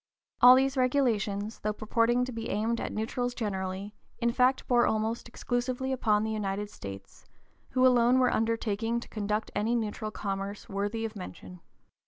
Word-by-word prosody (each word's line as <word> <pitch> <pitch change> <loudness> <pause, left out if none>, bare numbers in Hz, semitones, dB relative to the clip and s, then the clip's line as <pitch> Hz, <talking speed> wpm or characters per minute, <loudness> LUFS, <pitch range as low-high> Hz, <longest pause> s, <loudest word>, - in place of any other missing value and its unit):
All 250 +1 +10
these 270 +1 +2
regulations, 225 -6 +1
though 210 0 -1
purporting 230 +3 +1
to 255 - -6
be 225 -1 -5
aimed 225 +3 0
at - - -3
neutrals 245 +3 -2
generally, 195 -2 -3 0.2
in 235 0 +1
fact 255 +2 +2
bore 240 -1 +4
almost 220 +2 -1
exclusively 245 +2 -2
upon 215 -5 +2
the 220 - -2
United 205 -1 -3
States, 100 0 -10 0.4
who 255 0 +3
alone 245 0 +5
were 255 -1 +3
undertaking 225 0 0
to - - -10
conduct 210 0 -2
any 220 +4 0
neutral 215 -1 -2
commerce 200 -1 -4
worthy 205 +2 -2
of 220 0 -6
mention. 180 -1 -9
225 Hz, 160 wpm, -29 LUFS, 205-245 Hz, 0.4 s, All